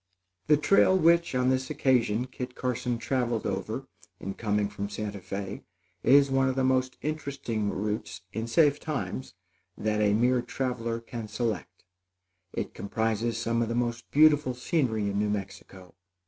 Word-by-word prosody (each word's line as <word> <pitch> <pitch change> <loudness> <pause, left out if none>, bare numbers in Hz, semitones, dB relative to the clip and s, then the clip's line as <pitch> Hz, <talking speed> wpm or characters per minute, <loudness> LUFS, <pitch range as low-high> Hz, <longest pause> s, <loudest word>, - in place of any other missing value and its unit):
The 150 - +6
trail 190 +4 +4
which, 170 -3 +4
on 125 0 +2
this 130 0 0
occasion, 120 -3 +2
Kit 125 0 -7
Carson 125 -1 -1
traveled 120 -2 -1
over - - -3 0.3
in 95 - -4
coming 105 -1 0
from 100 -1 -5
Santa 105 -1 -4
Fé, 100 +1 -5 0.4
is 140 +1 +5
one 135 0 +3
of 130 - -1
the 135 - +1
most 130 0 +1
interesting 140 -8 -2
routes, 105 +2 -3
in 110 +2 -3
safe 145 +3 +4
times, 140 - -4 0.4
that 105 0 0
the 105 -1 +3
mere 125 +3 +3
traveler 120 -2 -2
can 115 -1 -6
select. 105 -4 -3 0.7
It - - -4
comprises 110 +2 -1
some 115 +1 0
of 115 - 0
the 115 - -1
most 120 -1 -2
beautiful 150 -4 +5
scenery 125 -4 0
in 100 0 -1
New 105 0 +1
Mexico. 95 -2 -6
120 Hz, 155 wpm, -28 LUFS, 105-130 Hz, 0.7 s, The